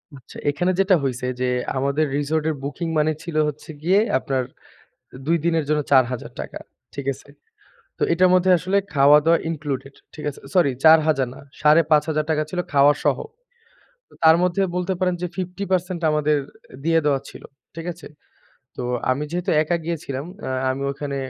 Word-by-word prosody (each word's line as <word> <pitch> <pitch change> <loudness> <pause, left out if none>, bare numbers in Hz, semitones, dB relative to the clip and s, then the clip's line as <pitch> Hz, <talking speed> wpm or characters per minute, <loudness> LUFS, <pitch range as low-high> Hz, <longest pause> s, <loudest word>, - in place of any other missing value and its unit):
আচ্ছা 130 -3 -14
এখানে 175 +6 0
যেটা 195 -1 +4
হইছে 125 -2 -2 0.2
যে 125 - +1 0.3
আমাদের 140 +3 +1
রিসোর্টের 155 +2 -1
বুকিং 145 +4 -4
money 155 +1 +2
ছিল 170 -2 -7
হচ্ছে 150 +1 -7
গিয়ে 185 +4 +4 0.2
আপনার 130 -1 -1 0.8
২ 165 +2 +3
দিনের 165 -2 +1
জন্য 150 0 +2
৳৪০০০ 125 -3 0 0.4
ঠিক 140 -1 -6
আছে? 135 - -15 0.7
তো - - -1
এটার 185 +2 +4
মধ্যে 185 0 +3
আসলে 185 +4 0 0.2
খাওয়া-দাওয়া 150 +4 +5
ইনক্লুডেড। 140 -4 -4 0.2
ঠিক 150 - -8
আছে? 140 - -11
সরি 170 -7 +4
৪০০০ 155 -4 +5
না - - -12 0.2
৳৫৫০০ 155 0 +3
ছিল 180 +2 -4
খাওয়া 145 +1 +6
সহ। - - +2 1.1
তার 160 0 +8
মধ্যে 180 +2 +1
বলতে 180 +1 -1
পারেন 180 -1 +1
যে 180 - -1
50% 185 -1 -2
আমাদের 150 0 +2 0.5
দিয়ে 165 +1 +3
দেওয়া 140 -2 +2
ছিল। - - -12 0.3
ঠিক 165 0 -7
আছে? 160 -2 -12 0.7
তো - - -4 0.3
আমি 135 +3 0
যেহেতু 175 +1 -2
একা 170 +3 0
গিয়েছিলাম 150 -5 -4 0.2
আ - - -3 0.2
আমি 135 +1 -3
ওখানে 140 0 -5
155 Hz, 150 wpm, -22 LUFS, 140-170 Hz, 1.1 s, তার